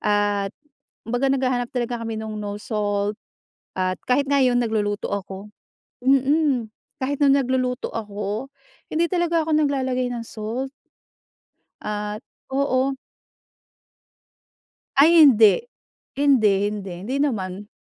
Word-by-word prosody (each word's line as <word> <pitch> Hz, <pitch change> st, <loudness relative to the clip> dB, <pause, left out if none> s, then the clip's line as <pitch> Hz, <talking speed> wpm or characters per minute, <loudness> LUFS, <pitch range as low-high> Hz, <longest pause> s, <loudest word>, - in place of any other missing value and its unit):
At 205 Hz, -1 st, +1 dB, 0.6 s
kumbaga 245 Hz, +4 st, 0 dB
naghahanap 255 Hz, -2 st, 0 dB
talaga 240 Hz, -1 st, -2 dB
kami 225 Hz, -1 st, -4 dB
no'ng, 220 Hz, -1 st, -5 dB
no 205 Hz, -1 st, -4 dB
salt, 205 Hz, -1 st, -1 dB, 0.7 s
at 185 Hz, 0 st, +1 dB, 0.2 s
kahit 280 Hz, +3 st, +3 dB
ngayon 265 Hz, -3 st, +3 dB
nagluluto 215 Hz, -3 st, -1 dB
ako. 200 Hz, +1 st, -6 dB, 0.5 s
Mm, 270 Hz, -2 st, +2 dB, 0.3 s
kahit 280 Hz, +2 st, -2 dB
no'ng 280 Hz, -1 st, +5 dB
nagluluto 255 Hz, -1 st, -1 dB
ako, 210 Hz, +2 st, -4 dB, 0.4 s
hindi 325 Hz, +2 st, +1 dB
talaga 340 Hz, -2 st, +1 dB
ako 320 Hz, -, -4 dB
naglalagay 265 Hz, -4 st, +1 dB
ng 235 Hz, -1 st, -5 dB
salt. 230 Hz, +5 st, -5 dB, 1.1 s
At 210 Hz, 0 st, -4 dB, 0.3 s
oo. 270 Hz, -1 st, +1 dB, 2.0 s
Ay, 325 Hz, +4 st, +7 dB
hindi! 225 Hz, -, +6 dB, 0.6 s
Hindi, 220 Hz, -9 st, +4 dB
hindi. 200 Hz, -3 st, -6 dB
Hindi 255 Hz, +5 st, -2 dB
naman. 205 Hz, -8 st, -2 dB
240 Hz, 110 wpm, -23 LUFS, 210-270 Hz, 2.0 s, Ay